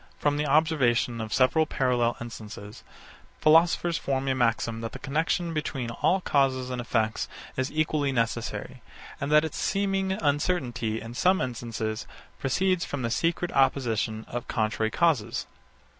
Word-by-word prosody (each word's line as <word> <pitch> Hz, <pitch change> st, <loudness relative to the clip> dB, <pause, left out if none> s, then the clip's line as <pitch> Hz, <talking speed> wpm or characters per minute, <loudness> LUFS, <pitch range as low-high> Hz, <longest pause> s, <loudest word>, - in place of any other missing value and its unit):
From 145 Hz, 0 st, +1 dB
the 150 Hz, 0 st, 0 dB
observation 135 Hz, -6 st, +2 dB
of 110 Hz, -1 st, -5 dB
several 155 Hz, +6 st, +3 dB
parallel 125 Hz, -4 st, +1 dB
instances, 105 Hz, -3 st, -9 dB, 0.6 s
philosophers 165 Hz, +1 st, +4 dB
form 135 Hz, 0 st, -1 dB
a -, -, +3 dB
maxim 115 Hz, -2 st, 0 dB
that 115 Hz, -, -5 dB
the -, -, -6 dB
connexion 165 Hz, +4 st, -1 dB
between 135 Hz, -6 st, -3 dB
all 185 Hz, +10 st, +1 dB
causes 130 Hz, -5 st, +1 dB
and 125 Hz, -1 st, -2 dB
effects 110 Hz, -2 st, 0 dB, 0.3 s
is 130 Hz, 0 st, -1 dB
equally 155 Hz, -2 st, +1 dB
necessary, 115 Hz, -2 st, -2 dB, 0.4 s
and 140 Hz, +1 st, -2 dB
that 150 Hz, +1 st, +6 dB
its 160 Hz, -, -5 dB
seeming 195 Hz, -1 st, 0 dB
uncertainty 140 Hz, -, 0 dB
in 115 Hz, +1 st, -8 dB
some 185 Hz, +9 st, +3 dB
instances 115 Hz, -2 st, -3 dB, 0.3 s
proceeds 185 Hz, +6 st, +1 dB
from 140 Hz, -3 st, -4 dB
the 115 Hz, -, -1 dB
secret 170 Hz, +7 st, 0 dB
opposition 115 Hz, -5 st, +1 dB
of 120 Hz, 0 st, -5 dB
contrary 110 Hz, 0 st, 0 dB
causes. 130 Hz, -8 st, +1 dB
130 Hz, 145 wpm, -27 LUFS, 115-155 Hz, 0.6 s, that